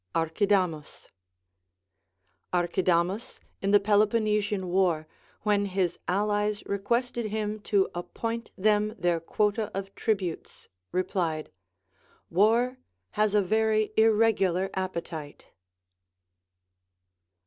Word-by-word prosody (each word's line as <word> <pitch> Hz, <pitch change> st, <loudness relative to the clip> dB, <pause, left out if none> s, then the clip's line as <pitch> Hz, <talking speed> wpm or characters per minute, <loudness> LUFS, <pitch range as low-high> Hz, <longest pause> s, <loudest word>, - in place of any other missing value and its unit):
Archidamus. 165 Hz, -1 st, 0 dB, 1.4 s
Archidamus, 180 Hz, +3 st, 0 dB, 0.2 s
in 195 Hz, -, 0 dB
the 205 Hz, 0 st, +6 dB
Peloponnesian 210 Hz, -1 st, +1 dB
war, 175 Hz, -4 st, +1 dB, 0.4 s
when 205 Hz, -1 st, +2 dB
his 185 Hz, -3 st, -1 dB
allies 205 Hz, +2 st, 0 dB
requested 235 Hz, +3 st, -1 dB
him 215 Hz, 0 st, -3 dB
to 200 Hz, -2 st, +2 dB
appoint 230 Hz, +6 st, -4 dB
tliem 210 Hz, +2 st, +2 dB
their 175 Hz, -2 st, +1 dB
quota 210 Hz, +5 st, 0 dB
of 195 Hz, 0 st, -5 dB
tributes, 195 Hz, -7 st, -3 dB, 0.2 s
replied. 170 Hz, -4 st, -1 dB, 0.8 s
War 235 Hz, +7 st, +3 dB, 0.3 s
has 210 Hz, -, +1 dB
a 205 Hz, -, +4 dB
wery 215 Hz, +2 st, +1 dB
irregukir 210 Hz, -4 st, +3 dB
appetite. 170 Hz, -5 st, -5 dB
200 Hz, 85 wpm, -27 LUFS, 180-215 Hz, 1.4 s, the